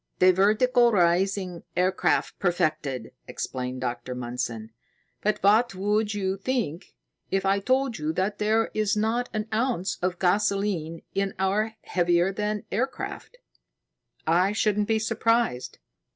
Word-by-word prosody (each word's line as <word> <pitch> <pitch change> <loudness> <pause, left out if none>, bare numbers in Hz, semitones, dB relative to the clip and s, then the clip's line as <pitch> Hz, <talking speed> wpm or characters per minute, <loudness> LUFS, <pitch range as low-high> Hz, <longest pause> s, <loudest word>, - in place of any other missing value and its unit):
"The 185 0 +6
vertical 235 +5 +4
rising 180 -1 +1 0.2
aircraft 185 +1 +1
perfected," 150 - -1 0.2
explained 130 0 -4
Dr. 125 0 -4
Mundson. 120 -2 -4 0.5
"But 210 0 +1
what 215 +2 +4
would 210 +2 0
you 190 -1 -1
think 195 - -3 0.3
if 195 0 0
I 195 +1 +3
told 260 +2 0
you 150 +1 -1
that 195 +4 -1
there 220 +2 +1
is 215 0 +1
not 230 +3 0
an 215 0 -3
ounce 225 -5 0
of 180 0 -1
gasoline 190 -3 0
in 195 0 -1
my 210 +4 0
heavier 175 +1 +2
than 210 +1 -2
air 240 +6 +1
craft?" - - -8 0.9
"I 180 +5 +3
shouldn't 210 -1 +1
be 225 - +2
surprised. 225 - 0
195 Hz, 130 wpm, -26 LUFS, 175-215 Hz, 0.9 s, The